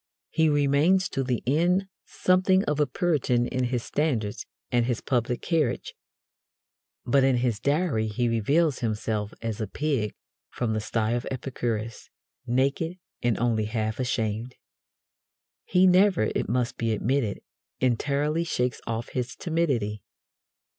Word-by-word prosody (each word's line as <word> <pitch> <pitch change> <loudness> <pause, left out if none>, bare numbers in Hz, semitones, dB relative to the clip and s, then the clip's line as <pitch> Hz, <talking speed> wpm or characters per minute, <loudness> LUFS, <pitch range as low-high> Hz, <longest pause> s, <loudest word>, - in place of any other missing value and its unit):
He 160 -1 +3
remains 145 +6 +3
to 135 - -1
the 125 -2 -1
end 175 +8 +2 0.2
something 185 +1 +3
of 150 0 -1
a 150 - +3
Puritan 130 -5 +1
in 130 0 -1
his 120 -1 -1
standards 120 -9 -1 0.2
and 120 -1 +2
his 120 -2 0
public 120 -1 -1
carriage, 155 -8 0 1.1
but 135 +2 +3
in 130 -2 +3
his 120 -4 0
diary 140 - +1
he 120 +3 0
reveals 140 +7 +2
himself 110 -2 -2
as 115 -1 -3
a 110 - -2
pig 135 -3 -1 0.3
from 115 -3 -2
the 110 - -1
sty 110 +1 -1
of 120 0 -1
Epicurus, 115 -4 -4 0.4
naked 140 +8 0 0.2
and 120 -2 +1
only 115 -2 +1
half 110 +1 -2
ashamed. 120 -2 -2 1.1
He 180 0 +4
never, 185 - +4
it - - -2
must 125 0 0
be 115 -1 0
admitted, 115 -1 0 0.4
entirely 145 +6 +1
shakes 125 -7 -1
off 115 0 -3
his 125 -1 -3
timidity. 135 - -1
125 Hz, 135 wpm, -26 LUFS, 115-150 Hz, 1.1 s, He